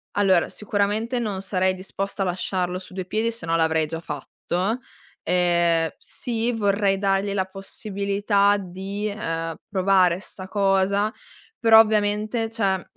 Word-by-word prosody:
Allora, 190 Hz, -4 st, +3 dB
sicuramente 210 Hz, +4 st, -1 dB
non 205 Hz, -5 st, -2 dB
sarei 190 Hz, -1 st, +1 dB
disposta 195 Hz, +1 st, -4 dB
a -, -, -1 dB
lasciarlo 180 Hz, 0 st, -2 dB
su 185 Hz, -, -13 dB
due 185 Hz, -1 st, -4 dB
piedi 220 Hz, +4 st, 0 dB
se 225 Hz, -7 st, -6 dB
no 165 Hz, 0 st, +1 dB
l'avrei 160 Hz, -1 st, +2 dB
già 165 Hz, +2 st, -5 dB
fatto. 180 Hz, -, -3 dB, 0.4 s
Ehm, 170 Hz, -2 st, +2 dB
sì, 235 Hz, 0 st, -2 dB
vorrei 200 Hz, -3 st, +1 dB
dargli 195 Hz, 0 st, +1 dB
la 190 Hz, -2 st, 0 dB
possibilità 200 Hz, +1 st, 0 dB
di, 195 Hz, +3 st, -5 dB
ehm, 165 Hz, -6 st, -3 dB
provare 185 Hz, -2 st, +3 dB
'sta 190 Hz, -1 st, -9 dB
cosa, 200 Hz, +1 st, +2 dB, 0.5 s
però 225 Hz, -1 st, +7 dB
ovviamente 215 Hz, +1 st, +2 dB
cioè, 200 Hz, -4 st, +1 dB
mhmm, -, -, -12 dB
195 Hz, 140 wpm, -24 LUFS, 185-210 Hz, 0.5 s, però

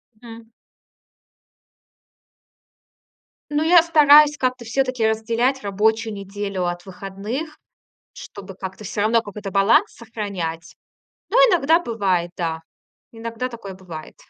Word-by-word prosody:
Мгм. 225 Hz, 0 st, -13 dB, 3.0 s
Ну, 295 Hz, +1 st, 0 dB
я 340 Hz, +1 st, +6 dB
стараюсь 300 Hz, -2 st, +6 dB
как-то 255 Hz, -2 st, -2 dB
всё-таки 255 Hz, -1 st, 0 dB
разделять 230 Hz, +4 st, 0 dB
рабочую 220 Hz, +2 st, 0 dB
неделю 200 Hz, -1 st, -4 dB
от 175 Hz, 0 st, -5 dB
выходных, 200 Hz, -, -6 dB, 0.6 s
чтобы 195 Hz, -2 st, -11 dB
как-то 190 Hz, +2 st, -8 dB
всё 205 Hz, +1 st, -3 dB
равно 225 Hz, +2 st, +3 dB
какой-то 205 Hz, -2 st, -8 dB
баланс 195 Hz, +3 st, +3 dB
сохранять. 180 Hz, -9 st, -6 dB, 0.5 s
Но -, -, +1 dB
иногда 345 Hz, -, +5 dB
бывает, 195 Hz, -, -1 dB
да. 165 Hz, -2 st, -3 dB, 0.5 s
Иногда 230 Hz, +2 st, -5 dB
такое 225 Hz, -5 st, -9 dB
бывает. 175 Hz, -4 st, -10 dB
220 Hz, 105 wpm, -21 LUFS, 195-255 Hz, 3.0 s, я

